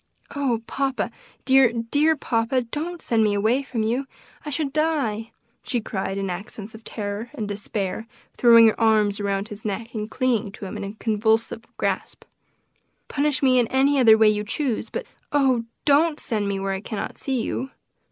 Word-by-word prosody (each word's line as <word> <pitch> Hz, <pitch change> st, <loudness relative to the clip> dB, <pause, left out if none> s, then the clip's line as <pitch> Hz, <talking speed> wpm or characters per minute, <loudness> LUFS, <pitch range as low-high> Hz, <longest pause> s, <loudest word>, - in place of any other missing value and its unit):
"Oh, 250 Hz, -5 st, 0 dB
papa! 270 Hz, +1 st, -1 dB, 0.3 s
dear, 265 Hz, -3 st, +6 dB
dear 285 Hz, +7 st, +2 dB
papa, 245 Hz, -1 st, 0 dB
don't 320 Hz, +8 st, -5 dB
send 225 Hz, -2 st, +2 dB
me 210 Hz, -1 st, +2 dB
away 220 Hz, +6 st, +2 dB
from 250 Hz, -5 st, -3 dB
you! 245 Hz, +5 st, -1 dB, 0.4 s
I 300 Hz, -, -5 dB
should 285 Hz, -1 st, -2 dB
die!" 280 Hz, -9 st, 0 dB, 0.3 s
she 245 Hz, -, -1 dB
cried 195 Hz, -3 st, -3 dB
in 195 Hz, 0 st, -2 dB
accents 200 Hz, +4 st, -6 dB
of 220 Hz, 0 st, -12 dB
terror 210 Hz, +2 st, -5 dB
and 215 Hz, -, -3 dB
despair, 205 Hz, +1 st, -4 dB, 0.3 s
throwing 230 Hz, -1 st, +7 dB
her 220 Hz, -, +3 dB
arms 215 Hz, -2 st, +3 dB
around 200 Hz, +1 st, -1 dB
his 210 Hz, -1 st, -9 dB
neck 220 Hz, +3 st, -4 dB
and 215 Hz, -1 st, -4 dB
clinging 235 Hz, -5 st, 0 dB
to 205 Hz, -, -8 dB
him 190 Hz, -, -6 dB
with -, -, -5 dB
a 200 Hz, +2 st, -7 dB
convulsive 225 Hz, +1 st, 0 dB
grasp. -, -, -2 dB, 0.9 s
"Punish 285 Hz, -2 st, 0 dB
me 255 Hz, -1 st, +5 dB
in 240 Hz, -, +2 dB
any 270 Hz, +3 st, +3 dB
other 225 Hz, -3 st, +7 dB
way 220 Hz, -1 st, +5 dB
you 210 Hz, 0 st, 0 dB
choose; 235 Hz, +2 st, -2 dB
but 480 Hz, -, -4 dB, 0.3 s
oh! 265 Hz, -5 st, +2 dB, 0.2 s
don't 300 Hz, +1 st, +4 dB
send 210 Hz, -4 st, -2 dB
me 200 Hz, -1 st, -1 dB
where 195 Hz, 0 st, -1 dB
I 190 Hz, -, -4 dB
cannot 215 Hz, -1 st, -5 dB
see 265 Hz, -2 st, -1 dB
you." 260 Hz, +3 st, -3 dB
230 Hz, 180 wpm, -24 LUFS, 210-270 Hz, 0.9 s, throwing